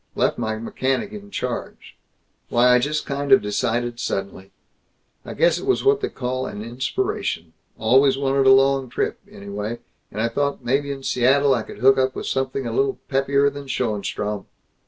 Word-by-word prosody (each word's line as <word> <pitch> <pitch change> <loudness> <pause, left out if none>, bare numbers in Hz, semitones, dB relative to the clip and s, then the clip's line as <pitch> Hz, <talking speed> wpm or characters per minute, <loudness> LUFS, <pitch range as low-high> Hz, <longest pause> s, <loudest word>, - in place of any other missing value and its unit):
Left - - +1
my 110 -2 -1
mechanic 130 - -2
in 205 -1 -9
charge. 125 -11 -5 0.5
Why, 120 +1 +4
I 125 - +5
just 150 +4 -1
kind 140 0 -3
of 135 - +9
decided 120 +3 -1
suddenly. 95 0 -4 0.7
I - - -8
guess - - +3
it - - -7
was 390 - +2
what 415 +1 +3
they 405 - -1
call 130 0 -3
an 105 - -6
inspiration. 135 - -3 0.2
Always 135 0 +4
wanted 135 0 +2
a - - +8
long 135 -1 +4
trip, - - -2
anyway, 105 +3 -5 0.3
and 105 - -6
I 115 - +2
thought 140 +1 -2
maybe 140 +3 0
in 135 -1 -6
Seattle 135 +3 +3
I 120 - 0
could - - -10
hook 135 +1 +5
up 130 0 +1
with - - -5
something 135 0 -2
a 115 - -3
little 135 +2 +1
peppier 140 +1 +2
than 140 0 -9
Schoenstrom. 105 -4 -2
130 Hz, 175 wpm, -22 LUFS, 120-140 Hz, 0.7 s, of